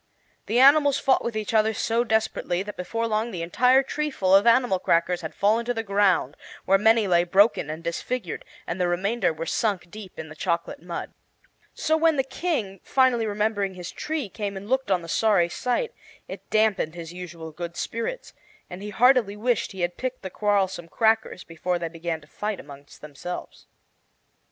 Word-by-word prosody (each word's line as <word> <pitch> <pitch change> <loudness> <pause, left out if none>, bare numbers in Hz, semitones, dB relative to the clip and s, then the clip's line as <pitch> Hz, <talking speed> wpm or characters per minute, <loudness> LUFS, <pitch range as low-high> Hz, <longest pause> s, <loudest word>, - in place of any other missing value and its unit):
The 225 - 0
animals 285 +2 +6
fought 265 - +2
with 235 -2 -3
each 215 +1 -3
other 220 0 +3
so 230 +3 +1
desperately 220 -5 0
that 210 +1 -8
before 230 +6 -3
long 220 +1 0
the 175 -6 -5
entire 250 +10 +4
treeful 270 -10 -1
of 200 +4 +6
animal 235 -5 +4
crackers 175 0 +1
had 160 - -7
fallen 215 +4 +2
to 245 0 -1
the 225 - -2
ground, 195 - +2 0.3
where 195 +1 +4
many 220 +1 +4
lay 175 -2 +4
broken 190 -2 +3
and 160 +2 -6
disfigured, 180 +4 -4 0.2
and 180 +2 -3
the 180 - +2
remainder 190 +3 0
were 160 +1 -5
sunk 190 -5 -1
deep 210 -3 -10
in 160 - -6
the 155 - -11
chocolate 170 0 -2
mud. 175 0 -6 0.6
So 315 - +1
when 325 0 +3
the 270 - +1
King, 265 - -3
finally 255 -4 +2
remembering 205 -2 -1
his 180 -1 -7
tree, 305 -6 -3
came 200 0 -5
and 195 +1 -8
looked 260 -2 0
on 180 -3 +1
the - - -9
sorry 185 -2 +2
sight, 250 - -1 0.4
it - - -9
dampened 215 -7 +1
his 170 -1 -8
usual 170 -3 -8
good 170 +2 -7
spirits, 230 - -4 0.4
and 180 +2 -7
he 210 - -6
heartily 225 -1 +3
wished 235 +1 0
he 190 - -7
had 175 0 -1
picked 255 -2 -4
the 190 - -6
quarrelsome 195 -4 0
crackers 220 -1 +1
before 175 +2 -2
they 170 -1 -4
began 165 -1 -4
to 150 - -18
fight 210 +5 -4
among 140 0 -12
themselves. 150 +4 -8
200 Hz, 185 wpm, -25 LUFS, 175-230 Hz, 0.6 s, animals